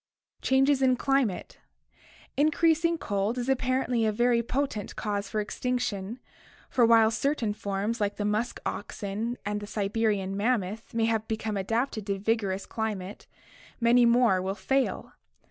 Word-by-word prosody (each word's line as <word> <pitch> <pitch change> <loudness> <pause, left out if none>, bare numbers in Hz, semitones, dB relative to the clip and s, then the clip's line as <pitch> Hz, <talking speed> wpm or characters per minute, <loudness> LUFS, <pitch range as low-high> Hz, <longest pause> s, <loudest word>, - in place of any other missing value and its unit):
Changes 270 +1 +3
in 255 -1 +4
Climate. 265 -7 0 0.4
— - - -28 0.3
Increasing 330 +3 +3
cold 205 -2 -1
is 245 0 -2
apparently 255 -2 +1
a 220 - +2
very 240 +2 +2
po 265 +4 0
tent 210 -7 -7
cause 205 -2 -3
for 215 - -1
extinction, 230 -1 -2 0.5
for 240 -2 +4
while 225 -1 +6
certain 240 -3 0
forms 205 +2 -3
like 205 0 0
the 205 - -3
musk 215 +4 -1
oxen 210 +4 -4
and 205 0 -1
the 205 - -8
Siberian 205 -2 -1
mammoth 215 0 -1
may 225 0 +2
become 220 -1 -2
adapted 220 +2 -1
to 200 -1 0
vigorous 200 -2 -1
cli 220 -1 -2
mate, 190 +1 -9 0.5
many 240 0 +5
more 235 -6 +4
will 190 +1 -2
fail. 265 +6 -1
225 Hz, 145 wpm, -28 LUFS, 205-250 Hz, 0.5 s, while